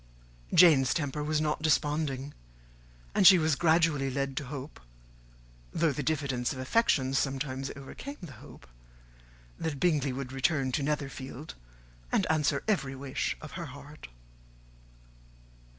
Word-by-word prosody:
Jane's 145 -8 +6
temper 150 -1 -2
was 155 +1 0
not 155 0 -1
desponding; 145 -3 0 0.8
and 190 - +6
she 190 - +10
was 155 -3 +2
gradually 160 -4 +2
led 135 0 -2
to 145 - -2
hope, 140 +2 -8 0.9
though 165 -2 +1
the 145 - -3
diffidence 135 -4 -1
of - - -6
affection 130 - +1
sometimes 135 0 -1
overcame 265 - -8
the 175 -6 -9
hope, - - -14 0.9
that 150 -4 -3
Bingley 150 -6 +2
would 130 0 -5
return 135 0 0
to 145 - 0
Netherfield, 140 0 -4 0.6
and - - +2
answer 155 -2 +1
every 140 -11 0
wish 135 0 -3
of 155 - -9
her 170 - -5
heart. 145 +2 -11
145 Hz, 130 wpm, -29 LUFS, 135-155 Hz, 0.9 s, she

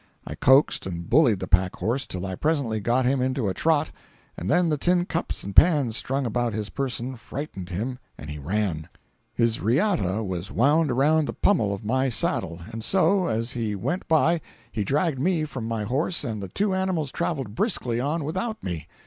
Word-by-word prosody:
I - - -6
coaxed 130 -5 +4
and 85 -2 -5
bullied 125 - +4
the 95 - -3
pack 90 +1 +2
horse 125 +5 -2
till 90 0 -5
I 95 - -4
presently 135 - 0
got 120 +5 +1
him 130 +1 +2
into 130 -3 0
a 95 - 0
trot, 155 - +1 0.4
and 90 - -5
then 175 +4 +3
the 150 - +1
tin 175 +2 +2
cups 170 -1 -3
and 100 0 -6
pans 145 -10 +5
strung 135 +2 -1
about 120 0 -1
his 105 0 -4
person 130 -1 -3
frightened 115 -7 -7
him 115 +8 -3 0.2
and 75 - -9
he 75 0 -6
ran. 85 0 -2 0.5
His 115 -1 +1
riata 115 - +1
was 95 0 -4
wound 145 +7 +3
around 145 +5 +3
the - - -3
pummel 135 - +2
of 100 +2 -5
my 130 +4 +1
saddle, 85 -7 -1
and 115 -1 -6
so, 190 - +3
as 115 +2 -1
he 110 -4 -2
went 175 - -3
by 165 +1 +3 0.3
he 105 - -2
dragged 145 - 0
me 165 +2 +1
from 130 -7 -5
my 115 -2 -2
horse 145 - -1
and 110 -3 -4
the 95 - -5
two 195 - 0
animals 185 -7 -1
traveled 140 -11 -2
briskly 120 - 0
on 150 +5 -1
without 200 +9 -3
me. 85 -5 -4
125 Hz, 195 wpm, -25 LUFS, 105-155 Hz, 0.5 s, pans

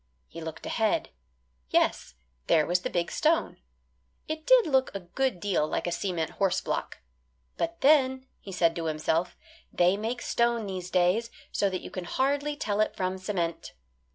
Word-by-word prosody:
He 165 - -9
looked 160 0 -7
ahead. 220 -2 0 0.6
Yes, - - +1 0.3
there 155 - +4
was 180 +1 +2
the - - -2
big 170 -1 -1
stone. 325 +2 +1 0.7
It 315 0 -5
did - - +7
look 265 -3 +2
a 195 - -3
good 195 +3 -1
deal 185 -6 +1
like - - -2
a 175 - -1
cement 175 -2 -2
horse 195 -2 +1
block. - - -3 0.6
"But 335 0 -3
then," 265 -2 +4
he 195 - -10
said 170 -3 +2
to 165 - -3
himself, 160 +2 -1 0.3
"they 180 +2 +3
make 230 +3 -3
stone 235 -2 +1
these 185 -2 -5
days 185 +6 +2 0.2
so 200 - +1
that 185 -1 -3
you - - -8
can 185 -2 -5
hardly 285 +7 0
tell 210 -7 -1
it 215 - 0
from 185 0 -2
cement." 180 -4 -3
195 Hz, 170 wpm, -28 LUFS, 175-260 Hz, 0.7 s, did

